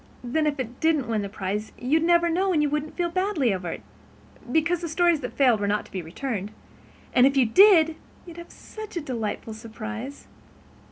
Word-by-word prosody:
Then, 305 +6 0
if 290 -1 -1
it 245 -1 -5
didn't 315 -5 +1
win 220 -2 0
the 200 - -5
prize, 205 +1 -4
you'd 290 +6 +1
never 340 +1 +4
know 370 +3 +1
and 305 -4 +2
you 290 - 0
wouldn't 300 +1 -3
feel 345 -1 -1
badly 350 - +1
over 180 -2 -4
it, - - -6 0.7
because 330 +4 +1
the 340 - -4
stories 340 0 +2
that 250 - -5
failed 250 -6 +4
were 205 - -1
not 210 +1 0
to - - -18
be 185 - -4
returned, 200 +4 -4 0.6
and 255 +1 +6
if 275 0 0
it 235 -4 +2
did 345 -6 +7 0.3
you'd 340 -1 -11
have 340 0 -10
such 435 -4 -9
a - - -1
delightful 225 -5 -4
surprise." 230 +4 -8
280 Hz, 205 wpm, -25 LUFS, 220-335 Hz, 0.7 s, did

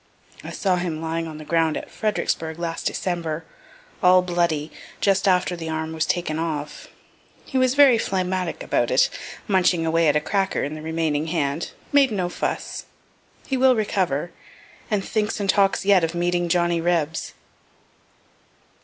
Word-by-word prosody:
(I - - -7
saw 185 -3 0
him 175 -3 -3
lying 165 +1 -3
on 155 -1 -8
the 155 - -9
ground 165 -1 +1
at - - -8
Fredericksburgh 165 -7 -2
last 170 -1 -3
December, 165 -3 -3 0.6
all 185 -1 +6
bloody, 170 -4 0 0.3
just 195 0 +2
after 180 -1 +2
the 165 -2 -6
arm 160 0 -3
was 160 0 -1
taken 160 -3 -1
off. 150 -3 -4 0.6
He 265 - -1
was 255 0 +2
very 275 -5 +6
phlegmatic 185 -3 -2
about - - +1
it, - - +3 0.4
munching 180 -4 +2
away 165 0 +2
at 150 - +3
a - - +4
cracker 195 +5 -1
in 145 - -3
the 155 - -7
remaining 160 -1 -1
hand 155 -2 -1 0.2
made 280 -2 +5
no 185 -4 -1
fuss.) - - -4 0.6
He 265 - -1
will 260 0 +5
recover, 180 -7 -1 0.6
and 205 -3 0
thinks 215 -1 -1
and 200 - -2
talks 195 0 +2
yet 195 -3 +5
of 165 +1 -1
meeting 175 0 0
Johnny 175 -1 +2
Rebs. 165 -2 -1
175 Hz, 160 wpm, -23 LUFS, 160-190 Hz, 0.6 s, all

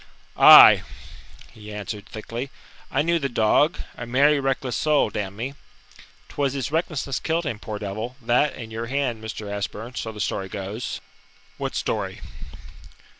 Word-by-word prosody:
"Aye," - - +10 0.7
he 105 0 -11
answered 105 0 -6
thickly. 115 +4 -6 0.4
"I - - +1
knew 170 +1 +1
the 140 -2 -2
dog 120 +8 +2 0.2
a 120 - -7
merry, 140 +4 +4
reckless 135 -2 -1
soul, 150 -6 +2
d - - -3
n 100 -1 -4
me. 125 +6 -4 0.7
'Twas 140 -2 -1
his 135 -1 -3
recklessness 155 -4 -1
killed 165 +1 -1
him, 115 -8 -3
poor 105 -1 -6
devil 110 +4 -5
that 125 +5 +1
and 115 -3 -9
your 115 +1 -4
hand, 125 -4 -2
Mr. 110 -1 -6
Ashburn, 105 +4 -5
so 115 - -4
the 105 - -11
story 95 -2 -2
goes." 100 +5 -5 0.6
"What - - -3
story?" - - -2
120 Hz, 155 wpm, -24 LUFS, 105-140 Hz, 0.7 s, Aye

